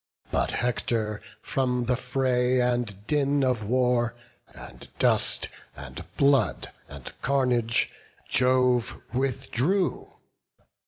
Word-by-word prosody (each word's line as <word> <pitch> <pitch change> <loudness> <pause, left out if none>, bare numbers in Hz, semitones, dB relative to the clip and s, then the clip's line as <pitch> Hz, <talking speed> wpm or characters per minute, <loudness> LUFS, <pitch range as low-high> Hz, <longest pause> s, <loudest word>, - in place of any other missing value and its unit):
But - - +1
Hector, 115 -3 -1 0.2
from 125 -2 0
the 125 +1 +1
fray 125 0 +1
and 120 -5 -1
din 145 0 +1
of 125 -4 +1
war, 120 +1 +1 0.4
And - - -12
dust, - - +2 0.3
and - - -7
blood, 140 -6 +2 0.2
and 70 -2 -8
carnage, 125 -4 +1 0.4
Jove 125 -1 +2
withdrew. 135 +7 0
125 Hz, 95 wpm, -26 LUFS, 120-130 Hz, 0.4 s, dust